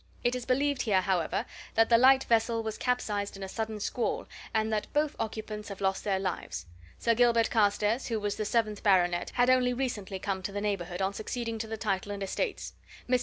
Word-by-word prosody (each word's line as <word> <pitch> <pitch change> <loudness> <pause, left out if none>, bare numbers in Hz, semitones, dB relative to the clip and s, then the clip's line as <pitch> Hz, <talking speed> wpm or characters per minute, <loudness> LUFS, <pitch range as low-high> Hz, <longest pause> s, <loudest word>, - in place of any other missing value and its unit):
It 240 - +2
is 250 -1 -4
believed 275 +2 +2
here, 200 -5 +3
however, 180 -4 0 0.3
that 225 0 +4
the 230 - +7
light 265 +1 +6
vessel 230 0 +2
was 220 -1 -3
capsized 210 -5 -1
in 195 - -7
a - - -4
sudden 220 +2 -4
squall, 235 +3 -1 0.3
and 220 0 0
that 210 - -2
both 295 0 +1
occupants 215 -1 -4
have 200 - -7
lost 190 -1 0
their 195 -2 +1
lives. 185 - -4 0.3
Sir 230 - +2
Gilbert 235 -1 +3
Carstairs, 210 +2 +2
who 225 -2 -1
was 205 -1 -2
the 215 - -2
seventh 215 -1 0
baronet, 175 -3 +3
had 245 0 +4
only 250 -1 +3
recently 215 -7 -3
come 190 0 -3
to 195 - -4
the 205 - -3
neighbourhood 195 -3 -2
on 190 +1 0
succeeding 230 +1 -4
to 220 - -3
the 220 0 -4
title 205 -2 -1
and 200 -1 -4
estates. 405 - -3 0.3
Mr. 250 0 +3
215 Hz, 210 wpm, -29 LUFS, 200-240 Hz, 0.3 s, the